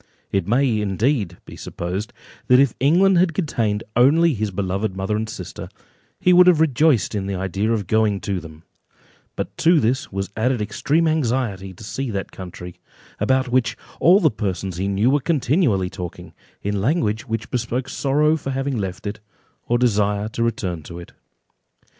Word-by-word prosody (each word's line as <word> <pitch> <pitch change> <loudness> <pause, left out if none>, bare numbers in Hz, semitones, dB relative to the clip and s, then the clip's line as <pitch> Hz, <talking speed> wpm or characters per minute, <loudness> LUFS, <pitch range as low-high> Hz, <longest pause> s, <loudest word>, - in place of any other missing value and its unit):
It 95 -3 0
may, 120 -1 +2
indeed, 105 - 0
be - - -11
supposed, 95 +6 -5 0.4
that 125 0 +6
if 135 -4 +4
England 175 +7 +4
had 175 -3 +2
contained 115 - -1
only 155 +7 +5
his 110 -3 -2
beloved 95 +1 -2
mother 95 +2 -1
and 110 +1 -2
sister, - - -7 0.5
he 180 - +4
would 180 0 +7
have 175 -4 +5
rejoiced 150 - +3
in 100 -2 -2
the 100 - -2
idea 95 +4 -1
of 110 -4 0
going 105 +1 +1
to 100 -2 -2
them, 80 -1 -12 0.7
but - - -5
to 165 0 +4
this 125 +2 0
was 95 0 -4
added 125 +2 +1
extreme 140 +10 0
anxiety 120 -10 -1
to 95 - -13
see 130 +5 -4
that 100 -3 -4
country, 90 -1 -9 0.4
about 130 0 +1
which 120 -3 +1 0.2
all 180 +4 +6
the 160 -7 +3
persons 95 -3 -3
he 95 +2 -1
knew 100 +6 +2
were 145 - +3
continually 135 - +1
talking, 90 -1 -8 0.3
in 100 -1 -1
language 115 - 0
which 115 0 -4
bespoke 125 +1 -2
sorrow 150 +4 +1
for 145 -3 -5
having 135 -1 -2
left 95 -1 -5
it, 105 +1 -4 0.5
or 120 - +2
desire 105 -3 +1
to 115 - -5
return 95 -7 -1
to 85 +3 -10
it. 85 - -10
110 Hz, 170 wpm, -21 LUFS, 100-135 Hz, 0.7 s, would